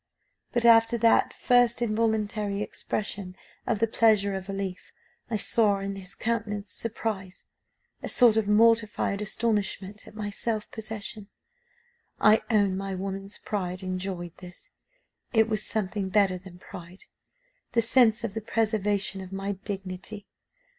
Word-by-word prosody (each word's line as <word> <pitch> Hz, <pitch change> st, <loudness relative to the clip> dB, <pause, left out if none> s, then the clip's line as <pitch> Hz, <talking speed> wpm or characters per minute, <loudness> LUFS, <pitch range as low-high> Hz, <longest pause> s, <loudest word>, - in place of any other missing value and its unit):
But 240 Hz, -1 st, +1 dB
after 230 Hz, 0 st, +6 dB
that 230 Hz, 0 st, +4 dB
first 245 Hz, -1 st, +3 dB
involuntary 215 Hz, -2 st, 0 dB
expression 200 Hz, -3 st, -4 dB, 0.3 s
of 230 Hz, -, +1 dB
the 225 Hz, -, +3 dB
pleasure 215 Hz, -3 st, +3 dB
of 190 Hz, 0 st, -5 dB
relief, 195 Hz, -2 st, -5 dB, 0.4 s
I 230 Hz, -, -1 dB
saw 210 Hz, -1 st, +3 dB
in 195 Hz, 0 st, -4 dB
his 195 Hz, -1 st, -9 dB
countenance 210 Hz, -3 st, -2 dB
surprise, 210 Hz, -4 st, -4 dB, 0.6 s
a -, -, -4 dB
sort 240 Hz, -4 st, +6 dB
of 220 Hz, -2 st, +1 dB
mortified 215 Hz, -1 st, +3 dB
astonishment 210 Hz, -1 st, -1 dB
at -, -, -13 dB
my 210 Hz, -1 st, -4 dB
self 215 Hz, +1 st, -2 dB
possession. 220 Hz, -3 st, -5 dB, 0.9 s
I 215 Hz, +1 st, +6 dB
own 205 Hz, -4 st, +3 dB
my 195 Hz, 0 st, -3 dB
woman's 195 Hz, +1 st, -4 dB
pride 185 Hz, -3 st, -4 dB
enjoyed 185 Hz, -2 st, -4 dB
this; 180 Hz, -1 st, -12 dB, 0.6 s
it 225 Hz, -1 st, +4 dB
was 215 Hz, -2 st, 0 dB
something 205 Hz, -2 st, -2 dB
better 190 Hz, -2 st, +2 dB
than 180 Hz, -1 st, -13 dB
pride 180 Hz, 0 st, -9 dB, 0.7 s
the 230 Hz, -1 st, +3 dB
sense 225 Hz, -2 st, +4 dB
of -, -, -3 dB
the 220 Hz, -, -4 dB
preservation 210 Hz, -3 st, 0 dB
of 185 Hz, 0 st, -9 dB
my 195 Hz, +1 st, -3 dB
dignity. 195 Hz, +1 st, -6 dB
205 Hz, 135 wpm, -27 LUFS, 195-220 Hz, 0.9 s, after